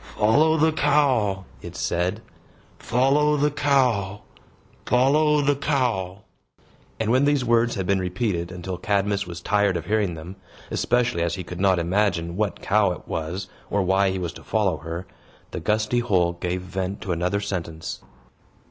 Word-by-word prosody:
"Follow 155 Hz, +9 st, +4 dB
the 160 Hz, +1 st, +3 dB
cow!" 130 Hz, -11 st, +2 dB, 0.2 s
it 85 Hz, +1 st, -9 dB
said. 90 Hz, +4 st, -1 dB, 0.6 s
"Follow 140 Hz, +5 st, +2 dB
the 150 Hz, +1 st, +2 dB
cow! 125 Hz, -9 st, +1 dB, 0.6 s
Follow 145 Hz, +5 st, +3 dB
the 145 Hz, 0 st, +2 dB
cow!" 120 Hz, -9 st, -1 dB, 0.8 s
And 110 Hz, 0 st, 0 dB
when 130 Hz, +3 st, +4 dB
these 145 Hz, -3 st, +2 dB
words 120 Hz, 0 st, +2 dB
had 95 Hz, -3 st, -2 dB
been 100 Hz, +1 st, +2 dB
repeated 90 Hz, -1 st, -2 dB
until 90 Hz, 0 st, -6 dB
Cadmus 100 Hz, 0 st, 0 dB
was 85 Hz, -1 st, -7 dB
tired 100 Hz, -1 st, +2 dB
of 85 Hz, -, -6 dB
hearing 105 Hz, -3 st, 0 dB
them 85 Hz, +5 st, -9 dB, 0.3 s
(especially 120 Hz, -7 st, +1 dB
as 85 Hz, 0 st, 0 dB
he 95 Hz, -, -5 dB
could 90 Hz, +1 st, -8 dB
not 95 Hz, -2 st, +4 dB
imagine 85 Hz, -1 st, 0 dB
what 105 Hz, +1 st, -2 dB
cow 100 Hz, -2 st, +3 dB
it -, -, -12 dB
was, 85 Hz, +4 st, -4 dB, 0.2 s
or 100 Hz, -1 st, +1 dB
why 95 Hz, +1 st, +3 dB
he 95 Hz, -, -2 dB
was 90 Hz, -3 st, -4 dB
to -, -, -12 dB
follow 100 Hz, -7 st, 0 dB
her), 85 Hz, +4 st, -6 dB, 0.5 s
the -, -, -4 dB
gusty 110 Hz, +3 st, +1 dB
hole 90 Hz, -7 st, +1 dB
gave 90 Hz, +1 st, -3 dB
vent 95 Hz, +1 st, -4 dB
to 95 Hz, -, -4 dB
another 90 Hz, +4 st, 0 dB
sentence. 85 Hz, -5 st, -5 dB
100 Hz, 160 wpm, -24 LUFS, 90-120 Hz, 0.8 s, Follow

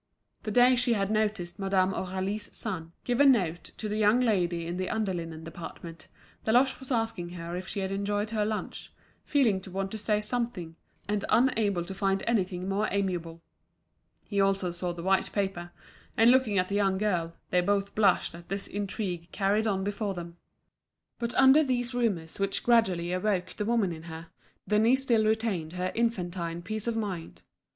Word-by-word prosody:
The -, -, -5 dB
day 245 Hz, +4 st, +5 dB
she 245 Hz, -1 st, +2 dB
had 200 Hz, -2 st, 0 dB
noticed 210 Hz, -4 st, -1 dB
Madame 190 Hz, -1 st, +2 dB
Aurélie's 190 Hz, +3 st, -3 dB
son 165 Hz, -7 st, -4 dB
giving 245 Hz, +3 st, +4 dB
a -, -, +9 dB
note 170 Hz, +1 st, -8 dB
to 215 Hz, -, -4 dB
the 210 Hz, 0 st, -2 dB
young 215 Hz, +3 st, +4 dB
lady 180 Hz, -8 st, +1 dB
in 170 Hz, +1 st, -4 dB
the 185 Hz, 0 st, -2 dB
under 215 Hz, -3 st, -1 dB
linen 165 Hz, -2 st, -5 dB
department, 165 Hz, 0 st, -9 dB, 0.4 s
Deloche 250 Hz, +4 st, +3 dB
was 265 Hz, 0 st, -8 dB
asking 225 Hz, -7 st, -1 dB
her 170 Hz, 0 st, -6 dB
if 185 Hz, +1 st, -5 dB
she 200 Hz, -, -3 dB
had 190 Hz, 0 st, -2 dB
enjoyed 205 Hz, +2 st, -1 dB
her 215 Hz, -2 st, +1 dB
lunch, 215 Hz, 0 st, -4 dB, 0.3 s
feeling 235 Hz, -10 st, +2 dB
to 190 Hz, -, -10 dB
want 195 Hz, +1 st, -3 dB
to 220 Hz, -, -5 dB
say 210 Hz, 0 st, +1 dB
something, 210 Hz, -7 st, -3 dB, 0.3 s
and 205 Hz, -1 st, -1 dB
unable 215 Hz, -8 st, +2 dB
to 195 Hz, -, -6 dB
find 195 Hz, 0 st, 0 dB
anything 185 Hz, -5 st, 0 dB
more 200 Hz, +2 st, 0 dB
amiable. 175 Hz, -4 st, -2 dB, 0.8 s
He 200 Hz, -2 st, 0 dB
also 195 Hz, -2 st, +1 dB
saw 175 Hz, +1 st, -3 dB
the 170 Hz, -1 st, -7 dB
white 190 Hz, +1 st, +2 dB
paper; 190 Hz, -4 st, -2 dB, 0.5 s
and 230 Hz, +2 st, +7 dB
looking 250 Hz, -6 st, +3 dB
at 185 Hz, 0 st, +2 dB
the 200 Hz, -, -5 dB
young 195 Hz, -2 st, +2 dB
girl, 175 Hz, -5 st, -1 dB, 0.2 s
they 180 Hz, -, +4 dB
both 200 Hz, +2 st, 0 dB
blushed 200 Hz, -6 st, +3 dB
at 170 Hz, +1 st, -12 dB
this 195 Hz, +1 st, -3 dB
intrigue 190 Hz, -4 st, -4 dB
carried 205 Hz, +3 st, +1 dB
on 190 Hz, -2 st, 0 dB
before 200 Hz, 0 st, -2 dB
them. 170 Hz, -1 st, -8 dB, 0.8 s
But 235 Hz, -1 st, -2 dB
under 270 Hz, +3 st, +7 dB
these 250 Hz, -2 st, -1 dB
rumours 200 Hz, -10 st, -1 dB
which 195 Hz, 0 st, -1 dB
gradually 185 Hz, -8 st, +3 dB
awoke 185 Hz, -1 st, 0 dB
the 210 Hz, -, -4 dB
woman 225 Hz, -5 st, +2 dB
in 160 Hz, -1 st, -7 dB
her, 165 Hz, +1 st, -8 dB, 0.4 s
Denise 225 Hz, +5 st, +4 dB
still 230 Hz, -4 st, +3 dB
retained 215 Hz, -7 st, 0 dB
her 180 Hz, 0 st, -2 dB
infantine 175 Hz, -7 st, -2 dB
peace 215 Hz, +5 st, -4 dB
of 235 Hz, -, 0 dB
mind. 190 Hz, -7 st, -5 dB
195 Hz, 180 wpm, -28 LUFS, 180-220 Hz, 0.8 s, a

